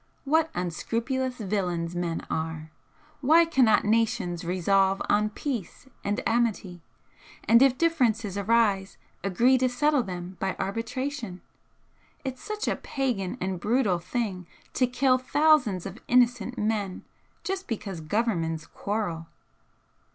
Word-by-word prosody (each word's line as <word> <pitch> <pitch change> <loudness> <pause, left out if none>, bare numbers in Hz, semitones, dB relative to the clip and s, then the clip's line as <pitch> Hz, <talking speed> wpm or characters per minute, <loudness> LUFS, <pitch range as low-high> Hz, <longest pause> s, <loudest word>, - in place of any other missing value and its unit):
What 320 +3 +2
unscrupulous 235 - -2
villains 180 -5 -2
men 175 -1 -2
are! 160 -1 -4 0.5
Why 320 +5 +5
cannot 255 -11 +3
nations 205 -5 +1
resolve 190 +2 +2
on 210 +1 +3
peace 235 - -5 0.2
and 205 +1 -1
amity, 210 -7 0 0.6
and 230 +1 +5
if 265 -2 +5
differences 235 - +1
arise 200 -2 +1 0.3
agree 240 +7 +3
to 255 0 +2
settle 290 +3 +2
them 180 -3 -6
by 190 -1 -1
arbitration? 230 -1 -4 0.8
It's 260 -1 -4
such 425 0 -4
a - - +1
pagan 245 -7 -2
and 185 -1 -2
brutal 210 -3 +1
thing 185 -1 -3 0.3
to 255 - +2
kill 255 +1 +2
thousands 255 - +3
of 195 +4 -8
innocent 245 -1 +2
men 210 -3 -2 0.4
just 380 0 -3
because 200 -6 -4
Governments 165 -4 -1
quarrel." 200 -6 -3
215 Hz, 120 wpm, -27 LUFS, 185-255 Hz, 0.8 s, Why